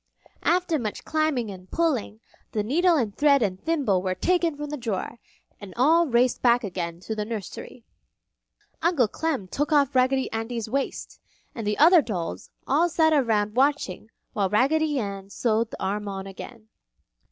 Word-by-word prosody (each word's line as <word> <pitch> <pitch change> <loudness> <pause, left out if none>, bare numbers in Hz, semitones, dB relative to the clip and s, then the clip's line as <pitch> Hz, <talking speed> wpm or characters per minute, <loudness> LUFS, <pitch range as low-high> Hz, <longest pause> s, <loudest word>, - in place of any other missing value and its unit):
After 350 -3 +1
much 215 -4 -5
climbing 310 -8 0
and 185 -1 -12
pulling, 265 -10 -1 0.3
the 210 -2 0
needle 335 - +3
and 220 -7 -1
thread 285 -3 +4
and 190 -2 -3
thimble 275 - +1
were 185 0 -2
taken 340 - +1
from 295 0 -6
the - - -2
drawer, 230 -2 -4 0.4
and 200 -3 -11
all 320 +7 +4
raced 245 -1 +2
back 240 0 +4
again 175 -4 -4
to 220 - -4
the 210 - -2
nursery. 220 +2 -7 1.0
Uncle 320 -8 +3
Clem 275 -5 -3
took 290 +10 -2
off 285 -2 +3
Raggedy 260 +1 +2
Andy's 225 0 -3
waist, 270 +5 -4 0.3
and 225 -3 -5
the 210 - 0
other 335 +3 +7
dolls 170 - -5 0.2
all 320 +6 +2
sat 315 -1 +3
around 220 -7 +1
watching 260 -7 0 0.2
while 195 -2 0
Raggedy 290 +8 +2
Ann 200 -4 -4
sewed 225 +1 0
the - - -9
arm 205 +2 -2
on 195 -1 -5
again. 215 +3 -10
240 Hz, 165 wpm, -25 LUFS, 205-295 Hz, 1.0 s, other